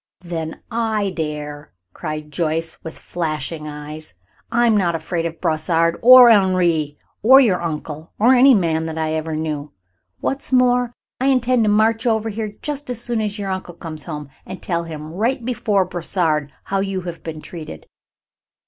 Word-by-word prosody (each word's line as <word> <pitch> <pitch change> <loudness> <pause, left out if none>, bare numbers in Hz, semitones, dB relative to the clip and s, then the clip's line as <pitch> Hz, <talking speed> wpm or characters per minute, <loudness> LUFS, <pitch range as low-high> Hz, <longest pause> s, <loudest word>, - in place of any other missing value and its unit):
"Then 165 -3 -5
I 220 -3 0
dare," 150 -3 -5 0.2
cried 155 -2 -6
Joyce 165 0 -1
with 160 - -7
flashing 155 -2 -4
eyes. 150 - -8 0.4
"I 240 +1 +3
am 225 -2 +4
not 175 -5 +2
afraid 165 0 -2
of 165 0 -9
Brossard 165 0 +1
or 250 0 +9
Henri 175 -7 +2 0.2
or 260 +5 +8
your 210 -10 +3
uncle, 155 -1 -5
or 240 +5 +5
any 260 +1 +7
man 165 -4 0
that 160 0 -5
I 160 -1 -1
ever 160 0 -2
knew. 155 -2 -4 0.5
What's 275 0 -3
more, 250 -1 +3 0.3
I 260 - +1
intend 255 -3 +3
to - - +2
march 225 +3 +2
over 220 -1 +1
here 215 -1 -5
just 290 -2 -4
as 245 -3 -4
soon 235 -1 -2
as 210 -1 -3
your 200 -2 -3
uncle 185 -2 -5
comes 155 -3 -8
home, 150 -4 -6
and 185 0 -8
tell 170 -2 -2
him 155 -1 -8
right 230 +6 -1
before 210 -5 +1
Brossard 165 -4 -1
how 195 - -1
you 195 -1 -2
have 175 -1 -7
been 160 -1 -6
treated." 155 - -9
175 Hz, 170 wpm, -20 LUFS, 155-220 Hz, 0.5 s, or